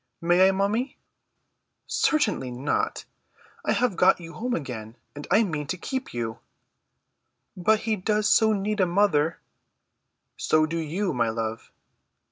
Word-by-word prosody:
"May 175 +2 +4
I, - - +3
mummy?" 205 +7 -1 0.9
"Certainly 210 - +1
not. 130 +4 -2 0.6
I - - +1
have 245 -6 +1
got 180 +2 +4
you 165 -1 -10
home 245 +2 -2
again, 115 -7 -6 0.2
and 145 - -8
I 210 +5 +5
mean 150 -7 -3
to 185 - -3
keep 260 +8 -4
you." 115 -2 -4 1.2
"But 215 +4 +2
he 220 -1 -1
does 210 +2 +1
so 220 +1 +5
need 210 +1 -1
a 185 - +3
mother." 170 -4 +2 1.0
"So 155 0 +2
do 165 +2 -3
you, 175 +4 -2
my 120 -3 +1
love." 110 0 -4
180 Hz, 140 wpm, -25 LUFS, 145-210 Hz, 1.2 s, I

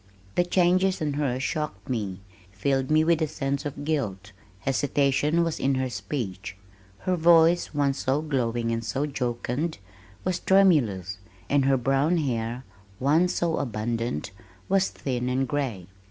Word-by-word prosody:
The 175 - +3
changes 185 +1 +2
in 150 -2 -1
her 140 -3 -1
shocked 135 -7 -3
me, 105 -7 -3 0.3
filled 130 +7 0
me 155 +1 +4
with 165 0 +2
a 160 - +2
sense 140 -1 -2
of 145 0 -7
guilt. 105 -11 -2 0.3
Hesitation 140 - +1
was 165 -2 -2
in 135 0 +1
her 130 -1 -1
speech. 95 -2 -5 0.4
Her 185 - 0
voice 165 -1 +4
once 140 -2 +1
so 140 +4 0
glowing 120 -5 -1
and 115 0 -2
so 130 +6 -1
jocund, 130 +3 -2 0.5
was 185 -1 -1
tremulous, 120 - +3 0.3
and 140 -1 +3
her 135 0 +4
brown 135 +7 +2
hair, 120 -4 -2 0.4
once 160 +7 +3
so 170 -2 0
abundant, 115 - -2 0.4
was 195 0 +2
thin 125 -2 -3
and 130 +1 0
gray. 125 -10 -2
135 Hz, 145 wpm, -26 LUFS, 120-155 Hz, 0.5 s, me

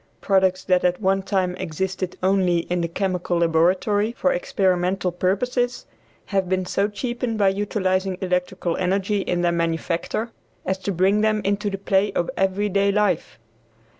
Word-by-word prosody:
Products 190 -2 +2
that 180 -1 +2
at 180 0 +1
one 195 -1 +1
time 190 -2 -1
existed 185 +1 -3
only 185 -2 +3
in 180 -1 +1
the 170 - 0
chemical 180 0 -1
laboratory 185 +6 +2
for - - +1
experimental 190 - 0
purposes, 245 +8 -1 0.4
have 195 -2 -1
been 185 0 0
so 200 +3 0
cheapened 240 +2 -3
by 200 -2 +4
utilizing 190 -2 -1
electrical 180 -1 -1
energy 195 +2 0
in 175 -2 -1
their 175 - +3
manufacture, 170 +6 -2 0.3
as 190 0 -1
to 200 - -3
bring 195 +3 +2
them 215 0 +2
into 200 +1 0
the 195 - -4
play 195 +1 +1
of 175 - -1
every 195 +2 +1
day 200 0 +2
life. 210 -5 0
190 Hz, 155 wpm, -23 LUFS, 180-205 Hz, 0.4 s, by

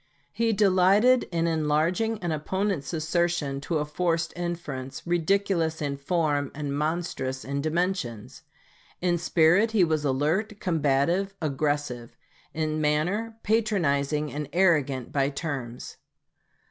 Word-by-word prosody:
He 230 0 +1
delighted 205 +4 +4
in 165 -1 0
enlarging 165 +7 +1
an 175 - -1
opponent's 190 +2 -2
assertion 160 -3 -1
to 160 +3 -1
a 150 - -1
forced 165 +2 -1
inference 150 -7 -5
ridiculous 170 -1 +1
in 145 -2 -2
form 145 -1 0
and 145 -1 -3
monstrous 150 -4 -2
in 140 +1 -2
dimensions. 155 - -2 0.6
In 175 -1 +1
spirit 175 +6 +3
he 205 -4 +5
was 155 -3 +1
alert, 160 +10 0
combative, 170 +4 +1
aggressive; 145 -5 -2 0.3
in 155 -1 -2
manner, 180 +10 0
patronizing 155 -10 +1
and 145 -1 -4
arrogant 150 -8 +2
by 140 -1 +1
turns. 135 -5 -5
160 Hz, 115 wpm, -26 LUFS, 145-180 Hz, 0.6 s, he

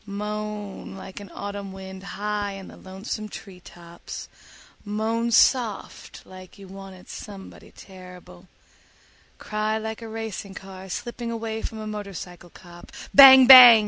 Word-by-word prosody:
Moan 210 -1 -6
like 190 0 -9
an 200 -2 -11
autumn 200 -1 -7
wind 190 0 -10
high 205 +1 -4
in 195 -1 -10
the - - -13
lonesome 200 +3 -7
tree 190 -2 -11
tops, 170 -1 -11 0.6
moan 220 +3 -2
soft 235 -2 +1
like 185 +1 -14
you 195 -1 -13
wanted 190 -1 -12
somebody 200 -2 -11
terrible, 180 -1 -14 0.9
cry 215 +1 -2
like 220 +1 -6
a 225 - -8
racing 220 -3 -6
car 190 0 -10
slipping 240 +4 -5
away 225 -1 -4
from 225 - -6
a 215 - -7
motorcycle 195 -4 -8
cop, 175 0 -15 0.2
bang 265 -2 +10
bang! 250 -3 +11
205 Hz, 135 wpm, -24 LUFS, 190-220 Hz, 0.9 s, bang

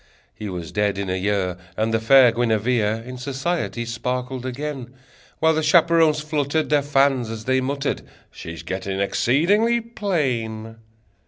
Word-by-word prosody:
He 105 - -7
was 85 -3 -6
dead 105 -1 0
in 100 -2 -3
a - - 0
year, 95 -2 -1 0.2
And 110 +1 0
the 115 - +2
fair 125 +2 +6
Guinevere 115 -1 0
In 125 0 -7
society 135 -1 -2
sparkled 125 +2 -3
again, 130 -1 -5 0.4
While 160 0 +3
the 160 - 0
chaperons 160 -1 +4
fluttered 150 0 -1
Their 145 -1 +4
fans, 135 -4 +2
as 110 -1 -6
they 130 0 +2
muttered: 140 +2 -2 0.3
"She's 85 -2 -9
getting 95 +1 -4
exceedingly 185 - +2
plain!" 130 - -3
125 Hz, 145 wpm, -22 LUFS, 110-150 Hz, 0.4 s, fair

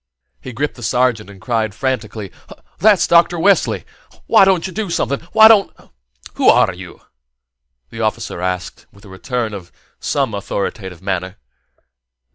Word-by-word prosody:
He 130 - -8
gripped 145 +6 -3
the 120 - -14
sergeant 120 -2 0
and 100 -1 -13
cried 110 -2 -2
frantically: 110 -5 -4 0.5
"That's 210 -2 +4
Dr. 170 +1 +3
Wesley! 195 +4 +1 0.4
Why 220 -4 +5
don't 190 -3 +2
you 190 - -6
do 215 -1 -3
something? 140 -4 -1
Why 220 - +8
don't 215 -3 +4 0.3
" 65 - -19
"Who - - +4
are - - +4
you?" - - -12 0.9
the 115 - -7
officer 110 -4 -3
asked, 90 0 -4
with 100 - -20
some 100 - -14
return 115 +3 -4
of 95 -4 -9 0.4
an 135 -6 0
authoritative 100 -2 -5
manner. 95 -1 -3
115 Hz, 150 wpm, -17 LUFS, 100-165 Hz, 0.9 s, Why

